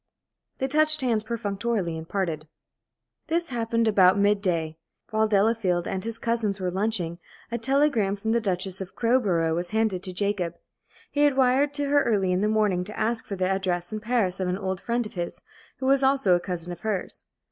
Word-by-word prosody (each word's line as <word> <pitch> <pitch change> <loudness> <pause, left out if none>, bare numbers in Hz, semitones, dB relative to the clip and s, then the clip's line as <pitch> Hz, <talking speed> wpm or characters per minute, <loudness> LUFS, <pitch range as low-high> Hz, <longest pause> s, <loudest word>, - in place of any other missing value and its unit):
They 265 - -1
touched 310 +2 +2
hands 235 -4 +1
perfunctorily 210 -4 -2
and 160 0 -8
parted. 165 -6 -2 0.8
This 335 +1 -1
happened 230 -2 0
about 190 -2 +5
mid 205 0 +3
day. 165 -4 -1 0.3
While 220 0 +2
Delafield 200 -4 +2
and 190 -1 -3
his 230 0 -1
cousins 225 -4 -1
were 180 -1 -1
lunching, 185 -4 -1 0.3
a 235 - -2
telegram 260 -5 +2
from 220 +2 -2
the 235 0 +2
Duchess 190 -2 -2
of 190 - -8
Crowborough 200 -10 +2
was 175 +1 -2
handed 220 -4 0
to 190 -1 -5
Jacob. 185 -2 -1 0.6
He 290 - -3
had 290 -2 +4
wired 265 +2 +3
to 290 -1 -1
her 285 0 +4
early 200 -7 +1
in 180 +1 +1
the 210 - +2
morning 210 -4 +2
to 210 - -8
ask 225 +1 -1
for 200 - -3
the 185 -1 0
address 185 -1 -1
in 215 - -2
Paris 215 -5 0
of 185 - -1
an 180 +1 -1
old 190 -2 -3
friend 240 0 -1
of 210 - -9
his, 175 -2 -4 0.4
who 260 - -4
was 270 +1 +4
also 265 -8 +3
a - - +1
cousin 175 -1 -4
of 175 - -7
hers. 210 -3 -3
205 Hz, 200 wpm, -26 LUFS, 185-235 Hz, 0.8 s, about